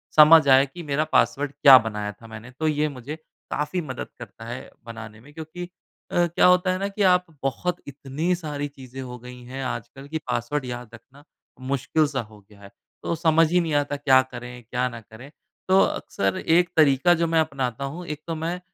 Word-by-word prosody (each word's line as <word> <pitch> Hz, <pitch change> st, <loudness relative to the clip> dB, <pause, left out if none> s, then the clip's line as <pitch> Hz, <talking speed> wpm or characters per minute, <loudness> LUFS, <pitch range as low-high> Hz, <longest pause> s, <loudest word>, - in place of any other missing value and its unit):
समझ 155 Hz, 0 st, +8 dB
आए 135 Hz, +1 st, +7 dB
कि 175 Hz, -, -8 dB
मेरा 150 Hz, 0 st, 0 dB
पासवर्ड 145 Hz, 0 st, +2 dB
क्या 135 Hz, -3 st, +11 dB
बनाया 105 Hz, -1 st, -4 dB
था 115 Hz, +3 st, -16 dB
मैंने 110 Hz, +2 st, -10 dB
तो 160 Hz, -, 0 dB
ये 150 Hz, 0 st, +1 dB
मुझे 140 Hz, +5 st, -6 dB, 0.4 s
काफ़ी 150 Hz, +5 st, -2 dB
मदद 130 Hz, -5 st, -6 dB
करता -, -, -11 dB
है -, -, -7 dB, 0.2 s
बनाने 115 Hz, -2 st, -9 dB
में 140 Hz, +6 st, -17 dB
क्योंकि 160 Hz, +3 st, -8 dB, 0.4 s
अ, 175 Hz, 0 st, +2 dB
क्या 170 Hz, -, +2 dB
होता 180 Hz, +1 st, +4 dB
है 185 Hz, -, -1 dB
ना 200 Hz, -, -1 dB
कि 200 Hz, +1 st, -6 dB
आप 180 Hz, 0 st, +3 dB, 0.2 s
बहुत 170 Hz, +7 st, -1 dB
इतनी 140 Hz, +5 st, -2 dB
सारी 145 Hz, -4 st, -4 dB
चीज़ें 135 Hz, -2 st, -10 dB
हो 125 Hz, -1 st, -7 dB
गई 125 Hz, +1 st, -11 dB
हैं 130 Hz, +2 st, -6 dB
आजकल 130 Hz, +3 st, -6 dB
कि 160 Hz, +2 st, -3 dB
पासवर्ड 125 Hz, +3 st, -2 dB
याद 120 Hz, -2 st, -6 dB
रखना 135 Hz, +5 st, -16 dB, 0.5 s
मुश्किल 140 Hz, +3 st, +1 dB
सा 135 Hz, -3 st, -2 dB
हो 110 Hz, -1 st, -14 dB
गया 100 Hz, 0 st, -21 dB
है। 100 Hz, -, -12 dB, 0.3 s
तो 170 Hz, -, -1 dB
समझ 160 Hz, -1 st, +3 dB
ही 180 Hz, -, +4 dB
नहीं 160 Hz, -3 st, -2 dB
आता 145 Hz, 0 st, 0 dB
क्या 130 Hz, -2 st, +5 dB
करें 125 Hz, 0 st, -9 dB
क्या 125 Hz, +2 st, -1 dB
ना 115 Hz, -1 st, -9 dB
करें? 110 Hz, +6 st, -13 dB, 0.4 s
तो 190 Hz, +1 st, +5 dB
अक्सर 95 Hz, -1 st, -1 dB
एक 175 Hz, +1 st, +4 dB
तरीका 155 Hz, +3 st, +5 dB
जो 170 Hz, -, +2 dB
मैं 165 Hz, 0 st, +2 dB
अपनाता 135 Hz, -4 st, -3 dB
हूँ 180 Hz, +1 st, -8 dB
एक 150 Hz, -2 st, -6 dB
तो 165 Hz, -, -2 dB
मैं 170 Hz, +3 st, -3 dB
140 Hz, 205 wpm, -24 LUFS, 125-160 Hz, 0.5 s, क्या